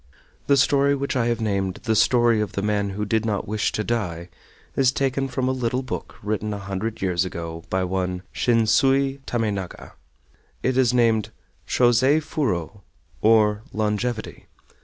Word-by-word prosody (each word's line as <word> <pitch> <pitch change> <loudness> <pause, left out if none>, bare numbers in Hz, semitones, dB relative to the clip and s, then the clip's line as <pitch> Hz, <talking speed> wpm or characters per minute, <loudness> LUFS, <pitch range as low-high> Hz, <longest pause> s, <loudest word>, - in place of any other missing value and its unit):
The 140 - +4
story 140 +1 +3
which 140 0 -3
I 120 -2 +1
have 120 -1 -1
named 100 -3 -1
"The 110 -3 +1
Story 120 0 +4
of 105 - -3
the 100 - -2
Man 105 -1 0
who 105 +2 -3
did 110 +1 +1
not 105 -3 -2
Wish 105 +1 0
to 110 - -1
Die" 90 -7 -3 0.5
is 130 -2 +3
taken 135 0 -1
from 130 0 -2
a - - +2
little 125 0 -1
book 130 - -6
written 105 0 -2
a - - -5
hundred 100 +2 -4
years 90 -2 +1
ago 85 -2 -6
by 95 0 0
one 90 0 -2
Shinsui 135 +4 +2
Tamenaga. 105 -6 -3 0.7
It 130 - +1
is 130 -2 +3
named 115 -3 +2 0.4
Chosei 130 +4 +4
Furo, 105 - -2 0.4
or 105 -1 +4
"Longevity." 110 +2 -2
110 Hz, 160 wpm, -23 LUFS, 100-125 Hz, 0.7 s, The